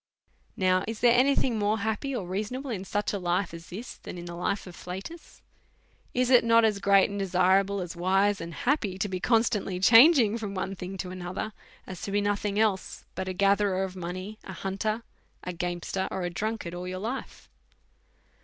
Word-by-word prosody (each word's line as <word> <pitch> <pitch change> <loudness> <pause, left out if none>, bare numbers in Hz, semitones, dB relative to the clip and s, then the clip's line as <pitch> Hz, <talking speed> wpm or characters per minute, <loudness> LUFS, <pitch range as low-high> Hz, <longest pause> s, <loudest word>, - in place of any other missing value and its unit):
Now, 185 0 +2
is 225 -1 -5
there 240 -1 +6
any 270 +3 +4
thing 235 -4 +1
more 210 +1 +1
happy 220 +6 -2
or 205 - -3
reasonable 215 +9 -4
in 195 -4 -4
such 205 +2 -1
a 200 - -1
life 180 0 -1
as 165 +1 -10
this 220 +7 -7
than - - -9
in 175 - -7
the 175 - -7
life 180 +4 -2
of 180 -2 -10
Flatus? 190 - -9 0.7
Is 250 +1 +2
it 250 -3 +7
not 230 0 +5
as 210 -2 +1
great 200 -1 +5
and 200 - -4
desirable, 195 +1 +2
as 175 -1 -6
wise 195 +3 +2
and 165 0 -6
happy, 215 - -1
to 200 - -1
be 185 -2 -3
constantly 220 -4 +1
changing 230 - +7
from 205 -3 -5
one 190 +1 -3
thing 185 +1 -6
to 180 -1 -5
another, 185 +4 -5 0.3
as 185 -2 -8
to 200 - -4
be 205 - +2
iiothing 205 0 -1
else 210 -3 0
but 185 0 -4
a 185 - -2
gatherer 195 0 +2
of 190 -1 -5
money, 185 +4 -6
a 190 - -8
hunter, 205 +5 -2 0.4
a 180 - -4
gamester, 175 +2 -3
or 190 - -3
a 175 - -2
drunkard, 210 -1 -3
all 180 +1 -5
your 185 0 -4
life? 230 +7 -5
195 Hz, 200 wpm, -28 LUFS, 185-220 Hz, 0.7 s, it